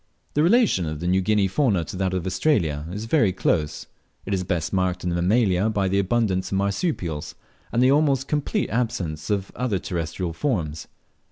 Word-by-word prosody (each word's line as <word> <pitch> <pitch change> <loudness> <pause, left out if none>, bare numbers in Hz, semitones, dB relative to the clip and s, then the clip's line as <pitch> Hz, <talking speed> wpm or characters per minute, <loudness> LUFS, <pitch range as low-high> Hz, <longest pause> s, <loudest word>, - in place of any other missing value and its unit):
The 150 - +2
relation 175 - +3
of 75 -1 -4
the 85 - -5
New 95 +2 +2
Guinea 105 0 +2
fauna 100 - +1
to 75 - -7
that 95 0 0
of 90 -1 -2
Australia 85 - 0
is 105 +4 -5
very 115 -5 +3
close. 80 -4 -1 0.4
It 100 - -2
is 95 -1 0
best 85 -2 -2
marked 95 -1 0
in 90 - -1
the - - -1
Mammalia 100 +1 +2
by 100 -3 0
the 100 +1 +2
abundance 100 -2 0
of 95 - +1
marsupials, 95 - -2 0.4
and 120 - +2
the 130 - +5
almost 140 -2 +2
complete 150 +8 -1
absence 95 -10 -2
of 100 -2 -1
all 125 - -2
other 105 -6 0
terrestrial 85 0 -3
forms. 85 - -2
95 Hz, 190 wpm, -24 LUFS, 85-120 Hz, 0.4 s, the